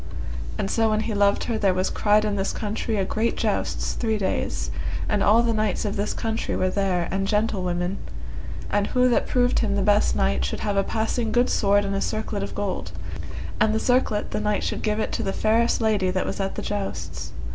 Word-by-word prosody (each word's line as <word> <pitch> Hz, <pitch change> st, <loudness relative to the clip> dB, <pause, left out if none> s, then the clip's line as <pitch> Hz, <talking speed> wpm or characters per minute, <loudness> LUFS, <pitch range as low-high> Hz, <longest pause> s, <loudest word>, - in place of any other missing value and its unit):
And 95 Hz, -, -1 dB
so 225 Hz, -1 st, +3 dB
when 215 Hz, 0 st, +1 dB
he 220 Hz, -, -2 dB
loved 200 Hz, 0 st, +3 dB
her 225 Hz, -2 st, -1 dB
there 195 Hz, -3 st, +3 dB
was 185 Hz, +1 st, 0 dB
cried 210 Hz, 0 st, +3 dB
in 210 Hz, -1 st, 0 dB
this 195 Hz, -1 st, -1 dB
country 215 Hz, +1 st, -2 dB
a 195 Hz, -, +1 dB
great 225 Hz, +4 st, 0 dB
jousts -, -, -1 dB
three 220 Hz, -2 st, 0 dB
days, 65 Hz, -, -1 dB, 0.4 s
and 210 Hz, -, +1 dB
all 220 Hz, +4 st, +5 dB
the 230 Hz, -1 st, +1 dB
knights 215 Hz, -2 st, 0 dB
of 205 Hz, -, -1 dB
this 205 Hz, +1 st, -1 dB
country 225 Hz, 0 st, -2 dB
were 185 Hz, 0 st, +1 dB
there 185 Hz, -4 st, 0 dB
and 195 Hz, 0 st, 0 dB
gentlewomen, 190 Hz, -4 st, 0 dB, 0.7 s
and 205 Hz, 0 st, +2 dB
who 250 Hz, 0 st, +3 dB
that 240 Hz, -, +2 dB
proved 245 Hz, 0 st, +2 dB
him 205 Hz, -3 st, +1 dB
the 200 Hz, -, +1 dB
best 205 Hz, +1 st, +3 dB
knight 65 Hz, 0 st, +1 dB
should 65 Hz, -, -2 dB
have 205 Hz, -1 st, -1 dB
a 195 Hz, -, +3 dB
passing 225 Hz, +2 st, -1 dB
good 245 Hz, +3 st, +3 dB
sword 205 Hz, 0 st, +3 dB
and 195 Hz, -, -2 dB
a 195 Hz, -, -1 dB
circlet 215 Hz, -1 st, -2 dB
of 200 Hz, -, -5 dB
gold, 200 Hz, -2 st, -3 dB, 0.7 s
and 215 Hz, 0 st, +3 dB
the -, -, +2 dB
circlet 245 Hz, -4 st, +1 dB
the -, -, -1 dB
knight 210 Hz, -1 st, 0 dB
should -, -, -2 dB
give 215 Hz, -1 st, 0 dB
it -, -, -1 dB
to -, -, -2 dB
the 195 Hz, -, -1 dB
fairest 230 Hz, +2 st, +2 dB
lady 210 Hz, -4 st, +2 dB
that 185 Hz, 0 st, 0 dB
was -, -, -4 dB
at 195 Hz, 0 st, -2 dB
the -, -, -4 dB
jousts. 65 Hz, -, -4 dB
205 Hz, 220 wpm, -24 LUFS, 195-220 Hz, 0.7 s, all